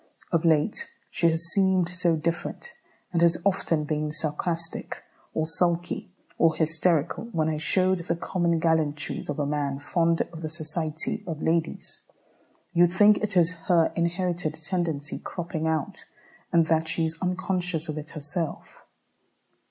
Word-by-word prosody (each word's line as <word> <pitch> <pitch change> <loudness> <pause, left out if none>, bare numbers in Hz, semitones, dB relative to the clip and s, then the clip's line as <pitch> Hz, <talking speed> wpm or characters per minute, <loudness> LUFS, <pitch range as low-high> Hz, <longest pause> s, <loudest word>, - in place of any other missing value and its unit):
Of 170 -2 +2
late 160 +5 +2 0.2
she 170 - +3
has 165 0 0
seemed 190 -3 +3
so 180 -2 +1
different, 170 - -3 0.4
and 170 - +2
has 170 0 +5
often 170 -5 +2
been 150 0 -2
sarcastic, 165 +2 -2 0.3
or 160 - +1
sulky, 175 +2 0 0.3
or 165 -1 +4
hysterical, 160 +3 +1
when 165 -9 -1
I 155 -1 0
showed 185 +3 +2
the 170 0 -2
common 170 -1 0
gallantries 160 -3 0
of 145 - -2
a 145 - 0
man 140 -1 -1
fond 165 +3 +1
of 165 - -8
the 155 - -3
society 155 +5 -2
of 160 -3 -4
ladies." 165 0 -1 0.7
You 175 0 +6
think 205 +4 +5
it 210 -3 0
is 170 0 +5 0.2
her 170 -2 +4
inherited 170 -2 -1
tendency 160 -3 -2
cropping 165 -2 -4
out, 160 -3 -1 0.5
and 165 -1 +4
that 160 0 +1
she 165 0 +1
is 160 0 -3
unconscious 180 -2 -1
of 155 -1 -3
it 155 +1 -9
herself. 150 +2 -4
165 Hz, 145 wpm, -26 LUFS, 155-175 Hz, 0.7 s, You